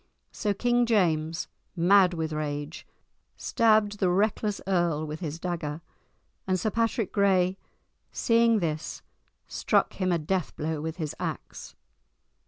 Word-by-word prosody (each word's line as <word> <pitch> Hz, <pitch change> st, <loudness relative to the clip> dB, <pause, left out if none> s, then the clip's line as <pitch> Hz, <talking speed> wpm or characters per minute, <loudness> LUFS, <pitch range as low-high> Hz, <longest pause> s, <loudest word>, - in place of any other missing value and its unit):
So 210 Hz, -, -1 dB
King 240 Hz, +2 st, +2 dB
James, 165 Hz, -7 st, +1 dB, 0.3 s
mad 180 Hz, +1 st, +5 dB
with 160 Hz, -1 st, -2 dB
rage, 145 Hz, 0 st, -4 dB, 0.5 s
stabbed 215 Hz, -3 st, +2 dB
the 185 Hz, -, +2 dB
reckless 205 Hz, +2 st, +1 dB
earl 175 Hz, -5 st, +1 dB
with 155 Hz, +1 st, -6 dB
his 160 Hz, -3 st, -4 dB
dagger, 165 Hz, -3 st, -4 dB, 0.7 s
and 185 Hz, -1 st, +1 dB
Sir 215 Hz, -, -1 dB
Patrick 230 Hz, -2 st, 0 dB
Gray, 190 Hz, -2 st, +3 dB, 0.6 s
seeing 230 Hz, -1 st, +3 dB
this, 155 Hz, -2 st, -3 dB, 0.4 s
struck -, -, +1 dB
him 185 Hz, -2 st, -1 dB
a 175 Hz, -, +3 dB
death 175 Hz, +3 st, -2 dB
blow 155 Hz, 0 st, -3 dB
with 160 Hz, +1 st, -4 dB
his 155 Hz, -4 st, -4 dB
axe. -, -, -6 dB
180 Hz, 130 wpm, -27 LUFS, 160-205 Hz, 0.7 s, mad